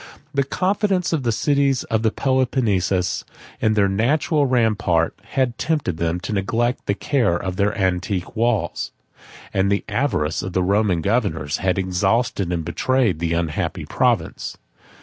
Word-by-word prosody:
The 140 - +2
confidence 185 +4 0
of 155 - +1
the 120 -2 0
cities 140 +2 +1
of 110 -1 -1
Peloponnesus 105 -9 +1 0.4
in 110 0 +2
their 100 -2 +4
natural 140 - +1
rampart, 105 -9 +2
had 130 -3 -1
tempted 145 - -1
them 85 +1 -1
to 105 - -4
neglect 115 +5 -1
the 100 - +1
care 120 -9 +1
of 90 0 -4
their 100 +3 0
antique 95 -1 -1
walls; 110 -6 0 0.6
and 95 +1 +2
the 100 - 0
avarice 80 - 0
of 95 - -5
the 90 - +1
Roman 100 -2 +2
governors 100 - 0
had 95 +1 0
exhausted 95 +2 0
and 85 -2 -2
betrayed 125 - +1
the 85 0 0
unhappy 85 -2 -2
province. - - 0
105 Hz, 145 wpm, -21 LUFS, 90-130 Hz, 0.6 s, their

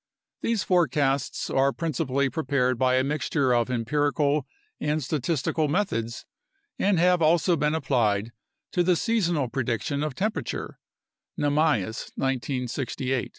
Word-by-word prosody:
These 230 -3 0
forecasts 140 -6 +1
are 135 +1 +3
principally 140 -4 -1
prepared 130 -4 0
by 130 0 +3
a 130 - +3
mixture 140 -2 0
of 120 0 +1
empirical 145 +4 0 0.3
and 150 0 -1
statistical 150 +2 0
methods 140 - -1 0.5
and 200 -2 +2
have 180 +1 +3
also 170 +2 +4
been 150 0 +1
applied 110 -7 +1 0.4
to 180 - +1
the 180 0 +3
seasonal 175 - +1
predic 120 -4 -2
tion 145 -1 -2
of 150 -3 -2
temperature 215 +3 -3 0.6
(Namias, 145 - +1
1968). 130 0 -2
145 Hz, 120 wpm, -26 LUFS, 130-160 Hz, 0.6 s, also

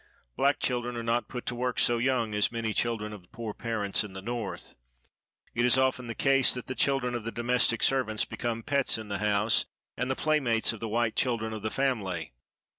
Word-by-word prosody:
Black 140 +1 +2
children 120 -1 -1
are 115 - -3
not 115 -1 0
put 125 -2 -6
to - - -2
work 125 0 -2
so 120 -1 +3
young 120 -3 +1
as 105 0 +2
many 115 -2 -2
children 110 -3 -1
of 90 -4 -13
poor 115 -2 -5
parents 110 -4 0
in 105 -3 -9
the 95 - -7
North. 115 -2 -5 0.8
It 120 - +1
is 125 +1 +5
often 130 -1 +1
the 115 - -5
case 135 -2 +4
that 125 - -6
the 130 - -4
children 125 0 +1
of 120 -2 -3
the 115 - -4
domestic 120 0 +1
servants 125 -5 +2
become 115 -1 -3
pets 140 -2 +2
in 110 -2 -8
the 100 -1 -2
house, 105 +1 +2 0.3
and 125 - -2
the 130 - +1
playmates 130 -9 +2
of 110 - -9
the 115 - -4
white 115 0 0
children 115 -3 0
of 110 - -5
the 110 - -2
family. 100 - -1
115 Hz, 210 wpm, -29 LUFS, 110-125 Hz, 0.8 s, is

